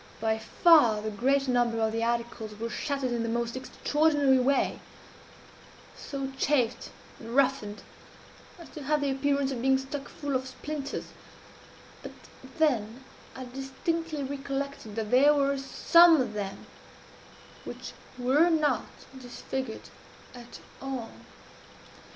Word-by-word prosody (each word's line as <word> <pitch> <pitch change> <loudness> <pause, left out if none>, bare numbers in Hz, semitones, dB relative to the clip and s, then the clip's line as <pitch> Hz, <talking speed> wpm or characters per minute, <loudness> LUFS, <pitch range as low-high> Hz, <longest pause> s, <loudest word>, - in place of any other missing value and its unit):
By 220 0 0
far 240 -2 +5
the 215 +1 -4
greater 265 +5 +1
number 240 -2 +1
of 220 -1 +1
the 225 +1 -2
articles 230 -2 -3
were 230 +2 -4
shattered 275 0 -2
in 240 -1 -1
the 230 - -2
most 235 +1 -2
extraordinary 290 0 +2
way 270 +2 +1 1.2
so 275 -1 -5
chafed 255 -5 +1 0.3
and 230 +1 -7
roughened 260 -6 +1 0.7
as 340 - -12
to 305 - -8
have 295 +2 0
the 280 -1 0
appearance 280 0 0
of 245 -3 -4
being 265 +1 +4
stuck 270 +1 -6
full 285 -2 -4
of 260 0 -1
splinters 285 +2 -6 0.9
but - - -9 0.4
then 250 -6 0 0.3
I 260 - -7
distinctly 280 +5 -3
recollected 275 -4 -5
that 220 -2 -3
there 285 +4 +6
were 280 -1 +2
some 335 +4 +5
of 250 -4 -1
them 200 -2 -5 1.0
which - - -8 0.3
were 270 +7 +3
not 300 -7 +1 0.3
disfigured 255 -1 -6 0.4
at 240 -1 -12 0.2
all. 260 -4 -5
265 Hz, 125 wpm, -28 LUFS, 235-280 Hz, 1.2 s, there